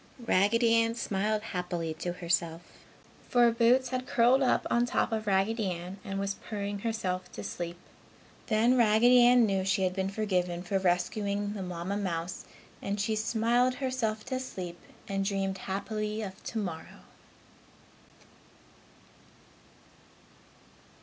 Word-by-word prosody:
Raggedy 230 +4 +3
Ann 230 0 0
smiled 210 -1 -1
happily 175 -5 -3
to 175 - -2
herself, 170 -1 -1 0.7
for 240 -1 +5
Boots 245 +2 +3
had 255 0 -3
curled 245 +3 +4
up 260 - +2
on 240 - +2
top - - 0
of 220 -1 -2
Raggedy 200 +2 +1
Ann 180 +2 -6
and 195 0 -4
was 200 0 -1
purring 205 -1 -5
herself 185 -5 -3
to - - -7
sleep. 175 0 -5 0.7
Then 230 +4 +3
Raggedy 240 +1 +6
Ann 245 -1 +6
knew 195 -2 0
she 190 0 +1
had 185 -1 +1
been 190 0 -1
forgiven 180 -4 -1
for 195 +1 0
rescuing 200 +3 0
the 205 - -5
Mamma 180 +2 -3
mouse 175 -3 -3 0.4
and 200 +1 -3
she 215 +2 0
smiled 235 +3 +2
herself 240 -5 -2
to 260 - -2
sleep 180 -9 -6 0.3
and 195 0 -1
dreamed 195 -1 -1
happily 215 +3 -3
of 190 -2 -8
tomorrow. 185 -8 -5
205 Hz, 130 wpm, -29 LUFS, 185-230 Hz, 0.7 s, Raggedy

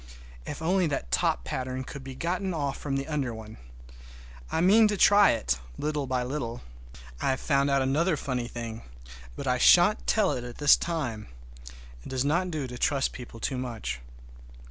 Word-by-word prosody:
If 150 +2 -6
only 180 +1 +2
that 100 - -3
top - - +1
pattern 130 - -4
could 140 +1 -9
be 135 -1 -8
gotten 180 +4 -2
off 140 -3 -2
from 140 -2 -4
the 135 - -4
under 140 -7 -2
one! 110 0 -10 0.9
I - - 0
mean 210 +6 +6
to 210 -1 -1
try 205 +1 +6
it, 105 - 0 0.2
little 150 -2 -2
by 130 -1 0
little. 125 -3 -4 0.6
I - - +1
have 130 0 0
found 140 -1 +1
out 140 -1 +2
another 155 +5 +1
funny 125 -4 -3
thing, 115 -2 -6 0.5
but - - -6
I - - +1
shan't - - +5
tell 65 - +3
it 120 -1 -5
this 145 -1 +6
time! 130 -11 -3 0.8
It - - -9
does 130 0 -1
not 170 +5 +1
do 155 -5 -3
to 125 -1 -8
trust 140 -2 +1
people 120 -2 -9
too 130 +2 -2
much. 110 - -4
135 Hz, 180 wpm, -27 LUFS, 120-155 Hz, 0.9 s, mean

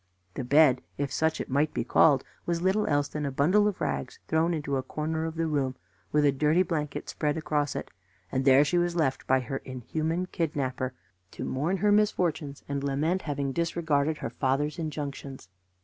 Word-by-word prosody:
The - - -4
bed, 135 0 +5 0.2
if 140 -1 -2
such 160 0 +1
it - - -3
might 145 +3 +1
be - - 0
called, 135 +2 +4 0.2
was 170 0 0
little 195 +3 +2
else 145 -1 +2
than 150 - -4
a 140 - 0
bundle 180 +10 +3
of 205 - -2
rags - - -2
thrown 160 +2 +2
into 150 -4 -2
a - - 0
corner 155 +4 -3
of 165 0 -4
the 165 0 0
room, 140 -4 0 0.4
with 150 -1 +3
a 140 - +5
dirty 150 +6 +3
blanket 150 -5 -3
spread 150 -1 -1
across 150 -2 -1
it; - - -5 0.4
and 130 - 0
there 135 +2 +6
she 175 +5 +2
was 175 0 0
left 150 -6 0
by 130 0 +3
her 130 +2 -4
inhuman 155 +8 -3
kidnapper 135 -7 -2 0.3
to - - -6
mourn 155 +9 -1
her 205 +2 +2
misfortunes 175 -9 +1
and 140 -1 -3
lament 150 +7 0
having 140 -2 -2
disregarded 160 -2 0
her - - -5
fathers' 145 +4 0
injunctions. 140 - -5
150 Hz, 190 wpm, -28 LUFS, 140-165 Hz, 0.4 s, there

